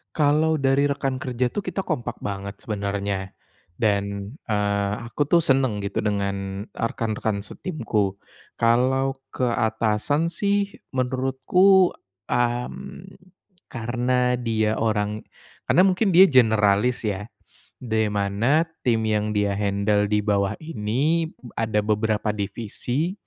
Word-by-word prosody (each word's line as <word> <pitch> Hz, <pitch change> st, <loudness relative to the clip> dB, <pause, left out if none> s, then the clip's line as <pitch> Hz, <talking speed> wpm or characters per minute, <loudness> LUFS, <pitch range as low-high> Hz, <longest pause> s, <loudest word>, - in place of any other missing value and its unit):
Kalau 155 Hz, +1 st, +3 dB
dari 140 Hz, -1 st, +2 dB
rekan 140 Hz, -2 st, -1 dB
kerja 125 Hz, -1 st, -1 dB
tuh -, -, -6 dB
kita 195 Hz, -1 st, -2 dB
kompak 120 Hz, -8 st, -4 dB
banget 100 Hz, 0 st, -4 dB
sebenarnya 100 Hz, -2 st, -3 dB, 0.4 s
dan, 100 Hz, -1 st, -1 dB, 0.2 s
eee, 100 Hz, -2 st, 0 dB, 0.2 s
aku 145 Hz, -, 0 dB
tuh 170 Hz, +3 st, +4 dB
senang 130 Hz, -8 st, +1 dB
gitu 100 Hz, -, -3 dB
dengan, 100 Hz, -1 st, -2 dB
eee, -, -, -4 dB
rekan-rekan 110 Hz, -4 st, -2 dB
setimku 110 Hz, -, -2 dB, 0.4 s
kalau 130 Hz, +3 st, +2 dB, 0.2 s
ke -, -, -3 dB
atasan 110 Hz, +7 st, 0 dB
sih 200 Hz, +2 st, -1 dB, 0.2 s
menurutku, 135 Hz, +9 st, +3 dB, 0.4 s
mmm, 120 Hz, +9 st, -2 dB, 0.6 s
karena 125 Hz, +1 st, 0 dB
dia 110 Hz, -2 st, 0 dB
orang 105 Hz, -1 st, 0 dB, 0.5 s
karena 180 Hz, -, +5 dB
mungkin 190 Hz, 0 st, +2 dB
dia 190 Hz, +1 st, +8 dB
generalis 110 Hz, -2 st, +3 dB
ya, 105 Hz, -2 st, -2 dB, 0.5 s
di 110 Hz, -3 st, 0 dB
mana 105 Hz, +10 st, +1 dB, 0.2 s
tim 115 Hz, -3 st, +1 dB
yang 105 Hz, -1 st, 0 dB
dia 105 Hz, -1 st, +1 dB
handle 100 Hz, +1 st, +1 dB
di 105 Hz, -1 st, +1 dB
bawah 100 Hz, -1 st, +1 dB
ini 155 Hz, +4 st, -1 dB
b 125 Hz, -7 st, -15 dB
ada 105 Hz, -2 st, 0 dB
beberapa 105 Hz, 0 st, 0 dB
divisi 120 Hz, -, -3 dB
115 Hz, 120 wpm, -24 LUFS, 105-135 Hz, 0.6 s, dia